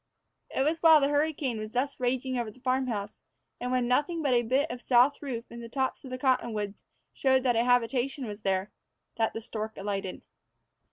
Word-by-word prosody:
It 265 - 0
was 320 +3 0
while 320 -2 +8
the 280 0 +2
hurricane 290 -5 0
was 215 0 -6
thus 275 +3 -1
raging 255 +1 0
over 240 -3 -2
the 250 - -15
farm 260 +1 0
house, 205 -3 -4 0.4
and 250 +1 -3
when 250 -1 +1
nothing 295 +6 +1
but 275 -3 +2
a 240 - +4
bit 260 +6 +1
of 245 0 -6
south 255 +3 +4
roof 250 -5 -4
and 235 0 -8
the 230 - -8
tops 265 +2 -2
of 265 - -8
the 255 - -4
cottonwoods 230 -6 -1 0.3
showed 265 -1 +2
that 245 -2 +2
a 230 - +3
habitation 250 +2 +1
was 210 -1 -7
there, 190 0 0 0.5
that 225 -1 +1
the 225 - -5
stork 220 -1 -5
alighted. 195 -2 -4
250 Hz, 205 wpm, -29 LUFS, 225-270 Hz, 0.5 s, while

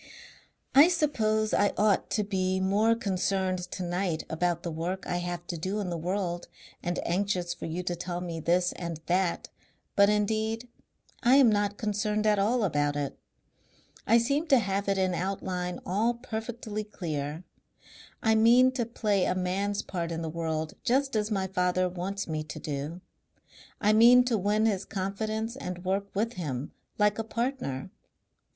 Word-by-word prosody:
"I 285 +4 +9
suppose 220 -11 +1
I 205 - +3
ought 210 -1 +2
to 210 - 0
be 190 -2 0
more 205 +4 +3
concerned 190 -3 0
tonight 180 -1 -2
about 170 +1 0
the 170 - -3
work 175 +4 -3
I 175 - -1
have 175 -1 -4
to 170 -2 -5
do 190 +5 -2
in 190 -4 -3
the - - -2
world 175 0 -2 0.3
and 175 0 -2
anxious 180 -1 0
for 175 - -7
you 170 +3 -3
to 175 -1 -2
tell 175 0 -4
me 170 -2 -4
this 175 +3 +2
and 170 -3 -5
that, 180 0 0 0.5
but 200 0 +6
indeed 220 +3 0 0.5
I 255 +1 +5
am 265 -5 +7
not 205 -1 0
concerned 210 0 -1
at 210 -1 +3
all 225 +4 +2
about 145 -5 +1
it. 145 -1 -2 0.9
I 230 - +6
seem 280 +8 +1
to 275 - +6
have 200 -2 -1
it 195 - +2
in 185 -1 +1
outline 180 -1 -3
all 220 +6 +1
perfectly 225 -2 -5
clear. 155 -6 -4 0.8
I 220 - +4
mean 240 +4 +6
to 245 -3 -2
play 210 -5 +1
a 185 - 0
man's 195 +2 -1
part 170 -2 -4
in 165 0 -3
the 160 - -3
world 160 -1 -3
just 270 +1 +1
as 210 0 +1
my 195 -3 0
father 180 -1 +1
wants 185 +3 -4
me 155 -1 -2
to - - -8
do. 150 +4 -4 0.8
I 210 0 +3
mean 240 +3 +8
to 245 -2 0
win 210 +3 +2
his 200 -3 +1
confidence 215 +4 -3
and 180 -9 -6
work 195 +2 0
with 225 +4 0
him 145 -6 -4 0.3
like 210 0 +2
a - - 0
partner. 225 - -3
195 Hz, 170 wpm, -28 LUFS, 175-220 Hz, 0.9 s, I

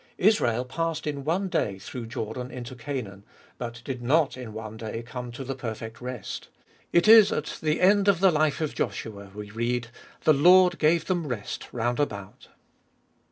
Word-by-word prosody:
Israel 125 - +3
passed 165 +4 -2
in 145 -2 -3
one 175 +7 0
day 100 - -1
through 115 +4 -7
Jordan 115 +3 -5
into 125 -1 -7
Canaan, 115 -6 -6 0.4
but 120 -1 -6
did 130 -3 -4
not 140 +4 +2
in 125 -3 -8
one 110 0 -7
day 115 +1 -5
come 125 0 -7
to 135 - -6
the 135 +1 -3
perfect 115 -2 -6
rest. 125 -3 -6 0.4
It 170 +4 +4
is 220 -2 +9
at 150 - -3
the 155 0 +1
end 200 +2 +4
of 200 -4 +4
the 190 0 +5
life 155 -1 +1
of 155 - -1
Joshua 100 -3 -4
we 105 -1 -7
read, 120 +1 -1 0.2
" - - -24
The 155 - +6
Lord 180 +4 +6
gave 160 +1 +3
them 175 -4 -1
rest 115 -6 -5
round 120 +1 -1
about." 100 -10 -4
125 Hz, 180 wpm, -26 LUFS, 115-160 Hz, 0.4 s, is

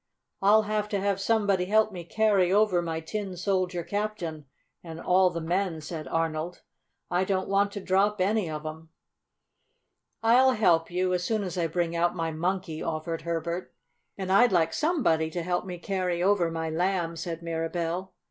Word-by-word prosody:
"I'll 210 +2 +5
have 210 0 -1
to 200 - -1
have 200 0 0
somebody 200 -4 +2
help 215 +2 +3
me 180 -3 -7
carry 200 -1 +2
over 200 -3 +3
my 165 -1 -3
Tin 190 +2 -5
Soldier 185 -2 -1
Captain 200 -7 -3 0.4
and 165 -1 -8
all 185 +2 +4
the 170 -1 -4
men," 175 0 -1
said 155 0 -6
Arnold. 165 +1 -2 0.5
"I 180 +1 +2
don't 190 0 -1
want 200 +1 +2
to 205 - -4
drop 195 +2 +1
any 200 -1 +1
of 155 0 -5
'em." 160 +1 -7 1.3
"I'll 255 +3 +5
help 175 -8 +3
you, 180 +1 0
as 180 -1 0
soon 215 +2 0
as 180 -3 -4
I 170 -2 0
bring 170 +1 -1
out 170 +1 +1
my 165 -2 -2
Monkey," 175 0 -2
offered 165 +1 -3
Herbert. 170 +2 -3 0.4
"And 190 -1 -3
I'd 240 +5 +5
like 165 -3 +2
somebody 250 - +1
to 170 +1 -4
help 175 +1 -1
me 180 -1 -5
carry 180 -1 -1
over 190 -3 +3
my 160 -1 -3
Lamb," 175 0 0
said 165 0 -5
Mirabell. 165 +2 -3
180 Hz, 175 wpm, -27 LUFS, 165-200 Hz, 1.3 s, I'll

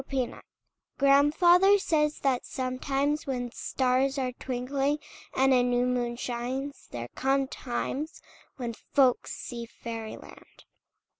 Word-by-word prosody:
FAIRIES 260 -3 -2 0.6
Grandfather 345 +8 +6
says 300 -5 +1
that 265 -3 +1
sometimes, 275 +4 -1
When 245 -3 -2
stars 260 +2 +1
are 255 -2 0
twinkling 270 +3 -1 0.4
and 265 0 +4
A 250 - +5
new 245 0 +2
moon 245 -1 0
shines, 255 +4 -4
there 120 0 -6
come 270 0 +1
times 265 +5 -4 0.4
When 240 -3 -3
folks 255 +2 +1
see 235 -1 -6
fairy 230 -1 -7
land! - - -15
260 Hz, 120 wpm, -28 LUFS, 245-280 Hz, 0.6 s, Grandfather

